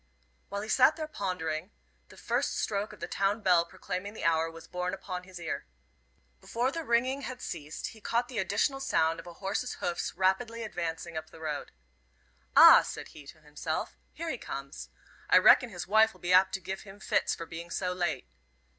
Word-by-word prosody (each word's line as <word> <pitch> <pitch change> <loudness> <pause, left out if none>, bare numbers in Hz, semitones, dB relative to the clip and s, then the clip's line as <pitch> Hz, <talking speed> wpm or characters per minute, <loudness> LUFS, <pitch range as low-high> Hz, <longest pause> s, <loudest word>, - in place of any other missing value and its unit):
While 200 - -3
he - - -6
sat 260 +7 +5
there 310 -2 -4
pondering, 180 - -3 0.4
the - - -15
first - - -1
stroke 205 0 -1
of - - -14
the - - -3
town 200 +3 0
bell 175 -3 +5
proclaiming 185 +4 -6
the - - -7
hour 165 0 +2
was 165 0 -11
borne 180 +1 -2
upon 180 -2 -6
his 185 -2 -10
ear. 165 - -4 0.7
Before 240 - -1
the 330 +2 -4
ringing 255 +2 +1
had 255 -2 -6
ceased, 150 +1 -5
he 220 - -14
caught 235 +3 0
the 245 -4 -4
additional 205 +8 +1
sound 165 -11 +1
of 165 - -10
a 175 - -8
horse's 195 +7 -3
hoofs 175 -1 -3
rapidly 205 +6 +1
advancing 170 -4 -4
up 155 0 -6
the - - -14
road. 150 -2 -4 0.9
"Ah," - - +11
said - - -7
he 145 -2 -13
to 155 +2 -13
himself, 150 -1 -4 0.2
"here 335 -1 -4
he 250 - -5
comes. 135 +1 -7 0.4
I - - +7
reckon 245 - +7
his 175 -5 -6
wife'll 220 +2 +4
be 175 +1 0
apt 185 +1 +5
to - - -4
give 190 +1 -5
him 200 0 -13
fits - - +1
for 165 - -7
being 165 +1 -8
so 180 +1 -1
late." 175 - -2
185 Hz, 195 wpm, -30 LUFS, 165-220 Hz, 0.9 s, Ah